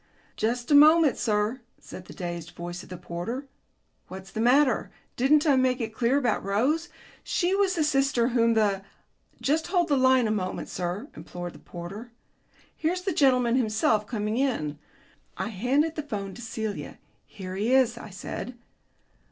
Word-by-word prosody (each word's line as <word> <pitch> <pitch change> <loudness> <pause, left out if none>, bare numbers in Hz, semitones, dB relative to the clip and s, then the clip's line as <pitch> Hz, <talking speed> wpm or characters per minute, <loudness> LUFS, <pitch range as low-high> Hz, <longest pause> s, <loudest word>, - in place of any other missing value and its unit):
"Just 240 +4 -1
a - - +6
moment, 305 0 +7
sir," 215 +3 0 0.2
said 180 - -10
the - - -11
dazed 175 -1 -6
voice 175 +1 -6
of - - -14
the 180 - -7
porter. 180 +10 -5 0.6
"What's 190 +1 -10
the 220 - -3
matter? 255 +2 +3 0.3
Didn't 290 +5 +3
I 290 -3 +5
make 255 0 +2
it 225 -2 -4
clear 240 +4 +2
about 245 -6 0
Rose? 270 - 0 0.3
She 360 +1 0
was 390 -1 +2
the 320 - +1
sister 275 -5 +2
whom 230 -2 +2
the 205 -3 +2 0.3
" - - -36
"Just 315 +3 +1
hold 350 -2 +1
the 285 - +3
line 260 -1 +4
a - - 0
moment, 185 -4 -3
sir," 180 +3 -4
implored 175 +2 -7
the - - -14
porter. 195 +7 -9 0.6
"Here's 360 +3 -1
the 380 -2 -1
gentleman 250 -4 +3
himself 215 -2 +1
coming 215 -1 -2
in." 155 - -1 0.6
I - - -2
handed 260 - +1
the 310 - -3
telephone 200 -9 -5
to 240 - -10
Celia. 220 -2 -5 0.3
"Here 185 -2 -8
he 210 +5 0
is," 260 -3 +4
I 235 - -9
said. 235 +5 -7
235 Hz, 170 wpm, -26 LUFS, 200-275 Hz, 0.6 s, moment